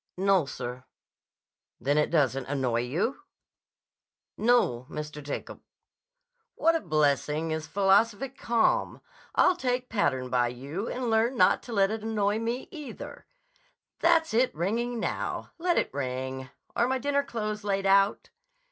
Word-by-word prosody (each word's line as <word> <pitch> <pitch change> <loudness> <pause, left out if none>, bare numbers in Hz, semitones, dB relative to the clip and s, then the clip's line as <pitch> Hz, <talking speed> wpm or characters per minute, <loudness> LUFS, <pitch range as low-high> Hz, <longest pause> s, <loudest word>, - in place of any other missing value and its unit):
"No, 190 -5 +3
sir." 125 -1 -6 1.0
"Then 145 +2 +2
it 150 - +2
doesn't 135 -5 +1
annoy 130 -4 0
you?" 165 - -2 1.1
"No, 170 - +2
Mr. 150 0 -6
Jacob—" 145 0 -6 0.9
"What 330 0 +3
a - - +2
blessing 150 +1 +1
is 155 0 -3
philosophic 205 - +2
calm! 235 -4 +1 0.3
I'll 365 - +5
take 250 -5 -2
pattern 130 - 0
by 125 -1 +3
you 140 - -5
and 250 -2 -2
learn 230 +3 +2
not - - +4
to - - -4
let 195 -1 +3
it 220 0 -3
annoy 210 -1 0
me, 235 +3 -3
either. 300 -5 -9 0.7
That's 320 -4 +3
it 250 +3 +2
ringing 230 +8 -1
now. - - -3
Let 350 0 +1
it - - 0
ring. 130 -1 -4 0.3
Are 235 - +3
my 265 +1 +1
dinner 280 +2 +1
clothes 215 -6 -4
laid 195 -1 -1
out?" 195 +1 +3
195 Hz, 140 wpm, -28 LUFS, 145-240 Hz, 1.1 s, I'll